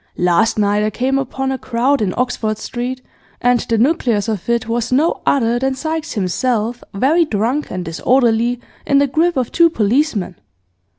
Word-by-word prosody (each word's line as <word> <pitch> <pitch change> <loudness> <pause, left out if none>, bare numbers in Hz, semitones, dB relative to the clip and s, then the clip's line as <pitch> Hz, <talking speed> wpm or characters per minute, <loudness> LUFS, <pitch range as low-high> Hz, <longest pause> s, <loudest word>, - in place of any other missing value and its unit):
Last 180 +6 +2
night 205 0 +2
I 215 - +1
came 260 +5 0
upon 270 0 -3
a 265 - -3
crowd 255 +3 0
in 190 -4 -1
Oxford 230 -4 -1
Street, 250 +3 -5 0.4
and 245 0 +3
the 230 0 -1
nucleus 235 -5 +1
of 215 -2 -3
it 235 -1 0
was 230 +1 -2
no 295 +6 +1
other 240 -3 +2
than 265 +1 -1
Sykes 320 +3 -3
himself 225 +4 -1
very 285 - +2
drunk 250 +2 -1
and 180 -1 -5
disorderly, 235 +6 +1 0.2
in 280 - +2
the 280 - +4
grip 320 +5 +1
of 250 -3 -1
two 335 0 +4
policemen. 220 - 0
245 Hz, 170 wpm, -17 LUFS, 215-270 Hz, 0.4 s, the